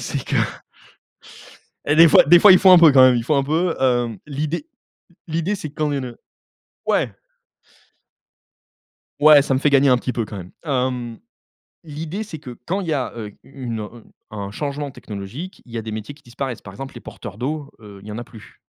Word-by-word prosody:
c'est - - -4
que - - -2 1.5
et 145 +1 +2
des 165 +1 +8
fois - - +7
des 175 +4 +7
fois 195 +2 +8
il 185 - +7
faut 190 - +6
un 180 - +9
peu 165 -3 +7
quand 135 -1 +7
même, 130 -1 +6
il 115 - -2
faut 150 - +1
un 140 - +2
peu 160 +5 0
hem, 120 -4 +1
l'idée 150 - -4 0.6
l'idée 165 +5 -1
c'est 155 -7 -6
quand 150 0 -2
une, 135 -2 -3
heu 120 -1 -10 0.7
ouais! - - 0 2.0
Ouais, 150 -1 +8
ça 135 - -1
me - - +1
fait 150 +2 +2
gagner 140 0 +4
un 125 - +5
petit 125 - -3
peu 115 - -2
quand 105 -1 -9
même, 90 -1 -10
hem, 125 -5 -2 0.6
l'idée 160 +5 -6
c'est 195 -7 -8
que 125 -4 -10
quand 190 +4 -1
il 190 - -6
y 160 - -1
a, 135 -4 -2
heu, 110 -2 -5 0.2
u 135 -1 -11
une, 115 -2 -3
heu, 105 - -6
u 115 - -14 0.3
un 100 -2 -6
changement 145 +5 -4
technologique, 115 - -8
il 120 - -16
y 115 - -4
a - - -4
des 110 - -6
métiers 110 +6 -6
qui 145 - -23
disparaissent. 120 -1 -6
Par 95 - -11
exemple, 135 +6 -9
les - - -9
porteurs 100 - -10
d'eau, 145 +4 -4
heu, 100 -2 -13
il 105 - -12
y - - -6
en 105 - -6
a 120 - -6
plus, 110 -3 -16
135 Hz, 220 wpm, -21 LUFS, 120-155 Hz, 2.0 s, un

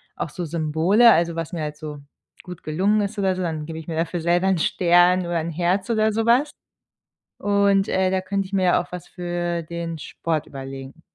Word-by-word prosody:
auch - - -4
so 175 +4 -5
Symbole, 165 +8 +4
also, 170 -3 +2
was 165 -2 -4
mir 170 - -3
halt 150 0 -4
so 150 -1 -7 0.4
gut 180 -2 -10
gelungen 195 +7 +1
ist 205 +1 -3
oder 190 -2 +1
so, 185 - -4
dann 160 -4 -3
gebe 160 0 -7
ich 160 - -11
mir 160 - -4
dafür 170 +1 -1
selber 175 +3 +2
'n 190 -1 +2
Stern 175 +2 +4
oder 170 -1 -1
'n 165 +1 -4
Herz 180 +5 0
oder 220 -1 +2
sowas. 235 +7 +2 0.9
Und, 200 -1 +2
äh, 185 0 +1
da 190 0 +1
könnte 195 +1 -2
ich 190 - -16
mir 190 -1 +1
ja 180 - +4
auch 180 - -18
was 180 -2 -7
für 175 -1 -3
den 170 0 -5
Sport 155 +1 -3
überlegen. 135 +2 -9
175 Hz, 210 wpm, -23 LUFS, 160-195 Hz, 0.9 s, Symbole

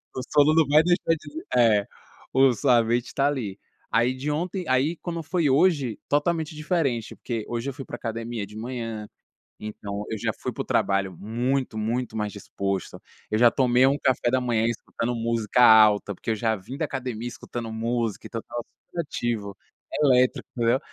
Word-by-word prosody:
o 130 - -2
sono 150 +1 +5
não 160 -4 +4
vai 150 +2 +5
deixar 175 -1 +2
de 150 -1 -11
di 160 +2 -7
é, 110 -4 +4 0.5
o 130 -1 +5
sua 120 0 +3
mente 120 +2 -1
tá 140 - +1
ali. 115 -9 -3 0.3
Aí 120 +2 +3
de 135 +3 -4
ontem 180 +4 -2
aí 135 +6 +2
quando 170 -2 -5
foi 165 -3 +1
hoje, 140 - +3
totalmente 160 +2 0
diferente, 150 - -1
porque 115 -3 -4
hoje 120 +3 -3
eu - - -5
fui 135 0 -8
pra - - -6
academia 115 -2 -4
de 105 +2 -14
manhã, 115 -3 -5 0.5
então 105 -1 -6
eu 110 - -3
já - - -1
fui - - -4
para - - -4
o - - -17
trabalho 95 -2 +1
muito, 120 +2 -1
muito 115 +1 -2
mais 105 -1 -2
disposto. 100 -1 -4 0.3
Eu 110 - +2
já 120 -1 +7
tomei 125 -1 +4
um 140 +1 +2
café 125 -2 +1
da 130 - +3
manhã 115 -2 +1
escutando 115 +1 -3
música 115 0 0
alta, 105 -3 +6
porque 115 - -3
eu - - +1
já 110 +1 0
vim 110 +8 -8
da 160 - 0
academia 125 -4 -4
escutando 120 -1 -6
música 115 -1 -2
e - - -21
tal, 115 - -4
tal 120 -1 -6 0.3
criativo, 120 - -3 0.5
elétrico, 125 -2 +3
entendeu. 120 +2 +2
120 Hz, 185 wpm, -25 LUFS, 110-140 Hz, 0.5 s, já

